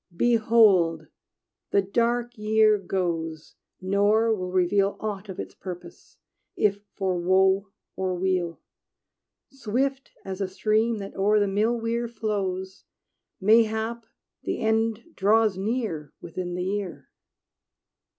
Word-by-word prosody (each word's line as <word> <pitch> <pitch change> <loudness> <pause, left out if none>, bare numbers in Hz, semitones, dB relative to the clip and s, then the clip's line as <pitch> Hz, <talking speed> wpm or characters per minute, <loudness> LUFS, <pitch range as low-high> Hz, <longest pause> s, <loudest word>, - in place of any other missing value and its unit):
Behold! 215 -9 +4 0.6
the 200 - +3
dark 235 +4 0
year 215 0 +3
goes, 165 -4 -3 0.3
Nor 205 +4 +2
will 185 -4 -3
reveal 195 +2 +2
Aught 205 -1 -5
of 190 - -7
its - - -6
purpose, 180 -2 -10 0.4
if 205 -1 +1
for 185 -2 -1
woe 190 +2 +3 0.3
or 185 -1 -1
weal, 180 -2 -1 0.9
Swift 270 +2 -2 0.2
as 190 0 -5
a 195 - 0
stream 215 +4 +1
that 195 -1 -7
o'er 210 +2 +3
the 205 - +2
mill 215 +4 +1
weir 230 +1 -1
flows: 195 -4 -3 0.5
Mayhap 220 +2 +2 0.3
the - - -3
end 220 0 +1
draws 215 +1 +3
near 195 - -3
Within 175 +1 -5
the 180 - -2
year! 185 -8 -4
200 Hz, 115 wpm, -25 LUFS, 185-220 Hz, 0.9 s, Behold